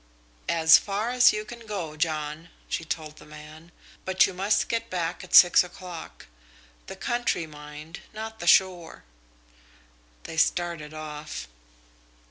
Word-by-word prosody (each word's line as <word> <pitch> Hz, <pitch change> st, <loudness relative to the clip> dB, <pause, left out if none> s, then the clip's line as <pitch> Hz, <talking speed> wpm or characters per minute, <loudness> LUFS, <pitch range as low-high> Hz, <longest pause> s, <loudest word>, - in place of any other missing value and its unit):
"As 160 Hz, -1 st, +6 dB
far 210 Hz, +4 st, -3 dB
as 250 Hz, 0 st, +6 dB
you 210 Hz, 0 st, -4 dB
can 235 Hz, -1 st, -11 dB
go, 175 Hz, -7 st, -5 dB
John," 155 Hz, 0 st, -3 dB, 0.2 s
she -, -, -3 dB
told 155 Hz, -1 st, -5 dB
the -, -, -14 dB
man, 155 Hz, +2 st, -13 dB, 0.3 s
"but 190 Hz, 0 st, +4 dB
you -, -, -4 dB
must 200 Hz, +3 st, +1 dB
get 230 Hz, 0 st, -2 dB
back 175 Hz, 0 st, -3 dB
at 180 Hz, -, -1 dB
six 175 Hz, 0 st, +8 dB
o'clock. 180 Hz, -1 st, -10 dB, 0.6 s
The -, -, -7 dB
country, 240 Hz, -8 st, -1 dB
mind 150 Hz, +2 st, -11 dB
not 220 Hz, +1 st, -7 dB
the 175 Hz, -, -6 dB
shore." 180 Hz, -1 st, +3 dB, 1.2 s
They 160 Hz, -, -8 dB
started 170 Hz, -2 st, 0 dB
off. 155 Hz, -1 st, -7 dB
170 Hz, 135 wpm, -26 LUFS, 155-195 Hz, 1.2 s, six